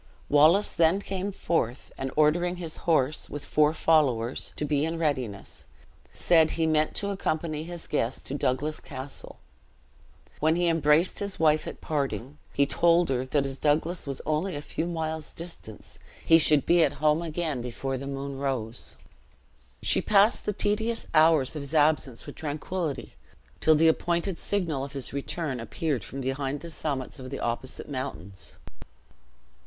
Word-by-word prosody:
Wallace 155 +8 +5
then 170 +3 +3
came 195 0 -3
forth, 140 - -2
and 135 - -4
ordering 175 +4 +3
his 170 -3 -4
horse, 150 -2 +2
with 145 - -6
four 150 0 +3
followers, 135 -8 +1
to 150 - -2
be 145 -1 +1
in 165 +1 -1
readiness, 130 -11 -3 0.4
said 160 -2 +4
he 165 - 0
meant 155 -1 +1
to 200 0 -1
accompany 155 -4 -2
his 175 -1 -7
guest 125 -4 -2
to - - -5
Douglas 145 +2 -1
Castle. 130 +2 -8 1.0
When 160 +2 +3
he 175 0 +1
embraced 160 +1 +3
his 200 -1 -5
wife 155 -1 +3
at - - -7
parting, 140 -2 -3
he 140 - +2
told 170 +2 +3
her 130 -1 -1
that 140 +1 +1
as 135 -1 -5
Douglas 155 +3 0
was 135 -1 -4
only 155 +4 -1
a 145 - -4
few 160 +2 -3
miles 160 -2 -3
distant, 165 -10 -9 0.3
he 165 0 +7
should 150 -2 +4
be 170 -1 +5
at 145 - +2
home 150 +2 +2
again 160 -5 -2
before 130 +2 -4
the 140 - -6
moon 140 0 -5
rose. 125 -4 -3 0.9
She - - +3
passed 210 +2 +3
the - - +2
tedious 220 +4 0
hours 155 -3 +4
of 150 - -3
his 140 +3 -6
absence 145 -5 +2
with - - -8
tranquillity, 155 +1 -4 0.5
till 160 - +5
the 160 +2 +4
appointed 170 +2 +1
signal 165 -9 -1
of 140 0 -7
his 135 -2 -5
return 140 -1 -2
appeared 135 +4 -2
from 135 - -6
behind 135 +2 -2
the 170 - -7
summits 140 -5 -3
of 130 0 -7
the - - -5
opposite 120 +2 -3
mountains. 130 -9 -6
155 Hz, 160 wpm, -27 LUFS, 135-165 Hz, 1.0 s, he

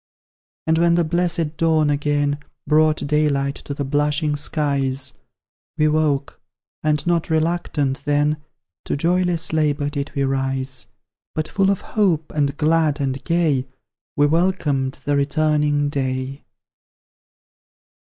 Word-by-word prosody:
And 160 0 +2
when 170 0 +4
the 175 - +3
blessed 165 -1 -1
dawn 160 -2 +3
again 145 0 0 0.3
Brought 155 +1 +3
daylight 140 -2 +1
to 140 - -7
the 140 - -3
blushing 150 +2 +1
skies, 140 -3 -1 0.6
We 155 0 +3
woke, 150 -2 0 0.4
and 150 -1 +1
not 175 -1 +1
RELUCTANT 155 -4 0
then, 145 +1 +2 0.5
To - - -1
joyless 175 +1 +1
LABOUR 145 -2 +1
did 145 -1 -4
we 140 - +1
rise; 135 -1 -1 0.5
But 155 0 -1
full 195 +2 +1
of 195 - +1
hope, 180 -8 0
and 145 -1 0
glad 155 -1 +2
and 135 -1 -2
gay, 155 -6 +1 0.5
We 145 - +4
welcomed 150 -5 +1
the 145 - +1
returning 150 0 +1
day. 130 -1 -3
150 Hz, 125 wpm, -21 LUFS, 140-160 Hz, 0.6 s, when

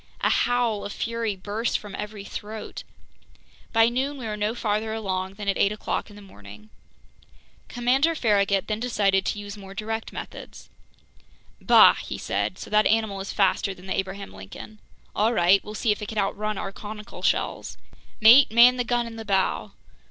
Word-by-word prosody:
A - - +2
howl 240 -4 +1
of 205 - -5
fury 230 -2 -2
burst 205 +5 -2
from 205 -2 -11
every 210 0 -6
throat! 210 +2 -7 0.9
By 225 0 +5
noon 265 +4 -1
we 250 - -7
were 215 -1 -3
no 210 +2 -1
farther 220 -1 -1
along 190 -3 -3
than 205 0 -7
at 195 - 0
eight 200 - +3
o'clock 210 +1 -3
in 205 - -14
the 205 - -12
morning. 105 - -14 1.0
Commander 265 +7 +1
Farragut 200 -6 +2
then 215 0 -3
decided 200 -5 +1
to - - -1
use 205 0 -7
more 195 0 -11
direct 220 +2 -4
methods. - - -9 0.9
"Bah!" - - +7
he - - -6
said. - - -2
"So - - -9
that 215 0 +4
animal 220 -3 +1
is 195 - -5
faster 195 0 +1
than 180 - -15
the 190 - -2
Abraham 195 +1 -4
Lincoln. 105 - -11 0.4
All 220 +3 +2
right, 185 0 +4
we'll 210 - -8
see 220 +1 +1
if 210 - -2
it 210 - -5
can 220 - -6
outrun 210 +1 -1
our 195 - -4
conical 210 +2 -9
shells! - - -1 0.4
Mate, 235 +5 +8
man 240 +2 +7
the 245 - 0
gun 240 0 0
in 230 -1 -8
the 225 - -6
bow!" 195 -3 0
210 Hz, 180 wpm, -25 LUFS, 195-225 Hz, 1.0 s, Mate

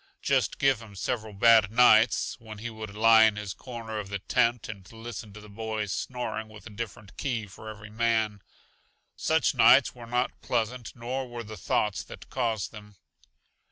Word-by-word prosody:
Just - - +1
give 135 -4 +2
him 105 -3 -12
several 110 +2 -3
bad 110 +1 +6
nights, 115 -2 +5
when 110 -2 -10
he 115 +3 -6
would 110 -2 -8
lie 110 +1 +6
in 110 -1 +3
his 105 -3 -5
corner 115 -3 -6
of 100 -2 -6
the 100 - -2
tent 115 +3 +1
and 100 -4 -9
listen 115 -1 -8
to 105 - -10
the 105 - -13
boys 110 -1 -4
snoring 110 -3 -4
with 105 -1 -13
a 115 - -9
different 105 -3 -7
key 120 -6 -2
for 105 +2 -11
every 105 0 -10
man. 110 -2 0 0.7
Such 160 -2 +2
nights 130 +1 +6
were 120 -2 -11
not 125 +2 -1
pleasant, 120 0 -2
nor 125 +3 -4
were 120 -1 -6
the 110 0 -9
thoughts 95 0 0
that - - -12
caused 115 -6 -1
them. 105 -2 -12
110 Hz, 180 wpm, -28 LUFS, 105-120 Hz, 0.7 s, bad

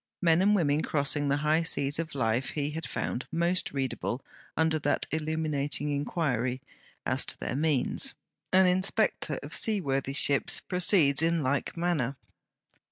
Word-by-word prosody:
Men 170 -1 +3
and 205 +2 +4
women 150 -5 +2
crossing 145 -1 0
the 140 - +2
high 155 +2 +3
seas 145 -3 +1
of 165 -3 -4
life 120 0 0
he 145 -1 -2
had 160 +1 -5
found 125 - -3
most 170 +2 0
readable 135 -2 -3 0.3
under 160 0 +2
that - - 0
illuminating 155 -2 -1
inquiry, 135 -4 -1 0.5
as - - +2
to - - -7
their - - -3
means. 145 -3 +1 0.4
An 190 0 +5
inspector 185 -4 +1
of 145 0 -7
sea 215 +6 +1
worthy 135 -4 -2
ships 140 0 +3
proceeds 175 -6 +2
in 165 -1 +1
like 140 +4 -1
manner. 160 -7 0
150 Hz, 150 wpm, -28 LUFS, 140-165 Hz, 0.5 s, An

